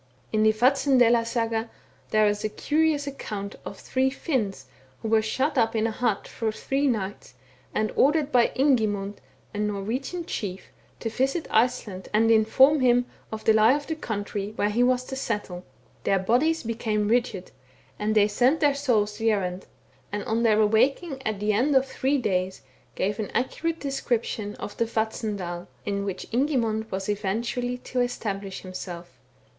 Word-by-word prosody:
In 215 - +2
the 220 0 +6
Vatnsdsela 245 0 +4
Saga, 230 -1 -1 0.4
there 215 0 +4
is 205 0 0
a 215 - 0
curious 300 +4 +1
accoimt 210 -8 -5
of 200 - -7
three 260 +5 0
Finns, 225 - -2 0.4
who 220 - -2
were 220 0 +4
shut 260 +6 0
up 225 0 +2
in 220 0 +1
a 225 - 0
hut 220 -2 -1
for 225 -1 -2
three 275 +6 -1
nights, 205 -6 -3 0.4
and 215 0 0
ordered 295 +1 +3
by 240 -2 +5
Ingimund, 215 -7 +1 0.4
a 205 - -4
Norwegian 220 - -2
chief, 190 - -5 0.3
to 225 - -2
visit 270 +7 0
Iceland 220 -5 0
and 225 +1 +4
inform 260 +7 +5
him 245 -1 +4 0.3
of 220 0 -5
the 220 - +5
lie 220 +3 +6
of 290 0 -4
the 320 - -2
country, 205 -5 -4
where 205 -1 +1
he 235 +4 +1
was 250 0 +3
to 265 - -6
settle. 205 -8 -3 0.4
Their 195 - +2
bodies 250 - +2
became 220 -2 -1
rigid, 230 -5 0 0.5
and 215 +1 0
they 205 -1 +5
sent 250 +9 +2
their 290 -2 +4
souls 225 -7 +1
the 225 0 +2
errand, 185 -3 -1 0.4
and, 205 0 -3
on 225 +1 0
their 220 -2 +4
awaking 265 - +2
at 215 -2 -2
the 210 +1 +1
end 265 +7 +2
of 265 0 +5
three 270 +1 0
days, 190 - -1 0.3
gave 200 +2 -1
an 215 - -3
accurate 330 +7 -1
description 235 -6 -2
of 205 - -7
the 230 - +2
Vatnsdal, 210 -6 -3 0.2
in 200 -1 -2
which. 190 -2 -4
Ingimund 230 -4 0
was 190 0 -3
eventually 230 +5 -1
to 250 0 -2
establish 200 -5 -3
himself. 180 -2 -8
225 Hz, 165 wpm, -26 LUFS, 205-255 Hz, 0.5 s, the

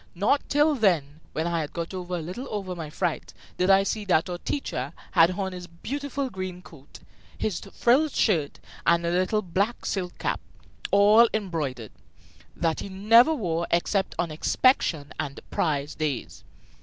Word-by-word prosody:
Not 210 +10 +2
till 295 +2 +4
then, 165 - +1
when 160 - -2
I 170 -1 0
had 150 +1 -6
got 170 +1 -4
a 185 - -3
little 180 - -5
over 195 -3 -4
my 160 -3 -6
fright, - - -3 0.2
did 180 +1 +1
I 195 0 +6
see 210 +2 -2
that 180 -2 +2
our 175 - -4
teacher 145 - -3 0.2
had 170 -2 +6
on 190 -2 -2
his 180 -1 -8
beautiful 280 +10 -4
green 185 -2 -6
coat, 140 -3 -14 0.4
his 210 - -2
frilled 275 +6 +3
shirt, 165 -10 +1 0.3
and 170 0 +4
the 170 - 0
little 185 +4 +1
black 195 +6 -1
silk 180 -3 -3
cap, - - -1 0.5
all 210 +3 +6
embroidered, 150 - -3 0.6
that 165 -2 0
he - - -6
never 230 +10 +5
wore 170 - -2
except 190 +3 0
on 170 -2 -1
inspection 155 - +1
and 145 -3 -4
prize 145 -3 -1
days. 145 -6 -4
180 Hz, 160 wpm, -26 LUFS, 165-210 Hz, 0.6 s, I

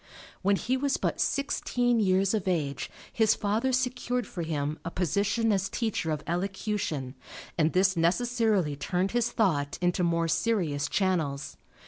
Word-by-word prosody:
When 200 +1 +3
he 255 +6 0
was 280 +1 0
but - - -1
sixteen 245 -4 +1
years 190 -1 +3
of 205 -3 -1
age 150 -7 -1 0.2
his 220 -1 +4
father 220 +5 0
secured 250 -1 0
for 175 - -6
him 155 -2 -2
a 165 - -3
position 200 +7 +1
as 195 -1 +1
teacher 220 -8 -2
of 150 -1 -2
elocution 180 - -2 0.4
and 160 -1 +2
this 190 +1 +3
necessarily 200 -2 +1
turned 180 +6 -1
his 240 0 +1
thought 150 -12 0
into 180 +1 +1
more 170 -1 +1
serious 160 -7 0
channels. 160 -8 -1
190 Hz, 145 wpm, -28 LUFS, 165-225 Hz, 0.4 s, his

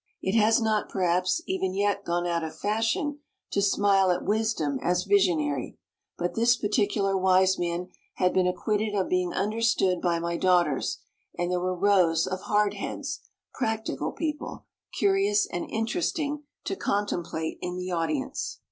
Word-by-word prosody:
It 190 - -2
has 225 +1 +5
not, 220 -2 0
perhaps, 180 -1 +1
even 190 0 -2
yet 200 0 +1
gone 175 0 -1
out 170 -1 0
of 160 0 -6
fashion 225 - -1 0.3
to 200 - +1
smile 195 -1 +3
at 175 - 0
wisdom 210 -11 0
as 180 +1 +1
visionary, 170 -9 +1 0.4
but 175 0 -2
this 235 +1 +4
particular 205 -2 0
wise 190 0 +3
man 175 +1 -2 0.3
had 180 0 +2
been 185 -1 +3
acquitted 210 +3 -1
of 190 -2 0
being 180 -1 +1
understood 210 -4 +1
by 175 -2 +1
my 170 0 -2
daughters, 175 -7 +2 0.4
and 175 0 -1
there 180 - +1
were 185 +1 -1
rows 180 -4 +3
of 185 0 -4
"hardheads," 210 -1 -1 0.3
"practical 220 -3 -2
people," 305 -2 -4 0.3
curious 200 +1 +3
and 175 - -5
interesting 295 +5 -2 0.2
to - - -2
contemplate 175 - -2
in 180 0 -4
the 180 0 -4
audience. 165 -5 -2
190 Hz, 145 wpm, -27 LUFS, 175-210 Hz, 0.4 s, has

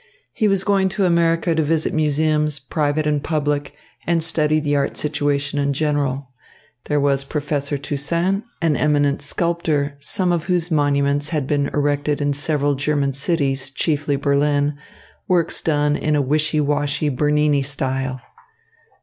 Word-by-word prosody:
He 215 - +1
was 195 -2 +1
going 195 -1 +2
to 195 - +3
America 170 -1 +2
to 160 - +1
visit 160 +1 0
museums, 150 0 +1
private 145 +2 -1
and 150 -1 0
public, 145 -2 -1 0.3
and 165 -1 +1
study 155 -1 +1
the 145 -1 0
art 140 -1 -1
situation 145 -1 -1
in 140 0 +1
general. 140 -3 -1 0.5
There 150 -1 +1
was 140 -1 +1
Professor 145 0 -2
Toussaint, 170 +8 -1 0.2
an 160 -3 +2
eminent 145 -1 +1
sculptor, 150 -2 -1
some 180 +5 0
of 170 -2 -1
whose 180 -2 0
monuments 145 -1 +1
had 150 -5 -1
been 140 0 0
erected 145 0 0
in 145 -1 0
several 145 0 0
German 140 0 0
cities, 135 -2 0
chiefly 145 0 -1
Berlin, 145 +1 +1 0.5
works 175 -2 +1
done 150 -2 +1
in 150 0 0
a 145 - +2
wishy 155 +3 +1
washy 145 0 0
Bernini 150 +1 +2
style. 135 -1 -2
145 Hz, 145 wpm, -20 LUFS, 140-155 Hz, 0.5 s, to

